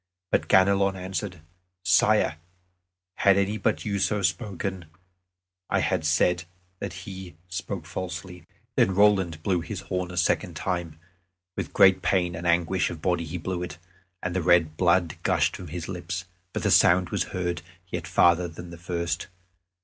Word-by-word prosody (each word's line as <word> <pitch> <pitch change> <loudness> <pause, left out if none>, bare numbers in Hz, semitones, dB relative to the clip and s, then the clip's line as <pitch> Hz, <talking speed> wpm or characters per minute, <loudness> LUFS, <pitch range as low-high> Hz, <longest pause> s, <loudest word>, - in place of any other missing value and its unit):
But - - +1
Ganelon 95 0 +4
answered, 95 -1 -5 0.4
"Sire, 95 -2 +4 0.8
had 100 -1 +5
any 100 +2 0
but - - 0
you 100 -2 -1
so 105 0 +1
spoken, 95 -4 -2 0.8
I - - +2
had 80 - 0
said 90 +2 +2 0.3
that 90 -2 -6
he 95 -4 -8
spoke 90 -1 -4
falsely." 90 -1 -6 0.3
Then 95 - +3
Roland 95 -6 +3
blew 90 -4 +1
his - - -6
horn 90 -1 -3
a 90 - -8
second 85 - +1
time; 85 -4 -3 0.6
with - - -4
great 95 -1 +6
pain 90 -1 +1
and 85 +1 -4
anguish 85 +2 +2
of 85 - -7
body 85 0 0
he 80 +3 -5
blew 90 +1 -3
it, 90 -1 -5 0.5
and 90 0 -2
the 95 - +1
red 85 -2 +3
blood 90 -1 +2
gushed - - +2
from 90 - -8
his 85 +3 -5
lips; 90 -1 -4 0.3
but - - -4
the - - +2
sound 90 -1 +5
was - - 0
heard 90 -2 -3 0.3
yet - - -4
farther 85 +1 +4
than 85 +1 -10
at 85 - -10
first. 85 -1 -3
90 Hz, 160 wpm, -26 LUFS, 85-95 Hz, 0.8 s, great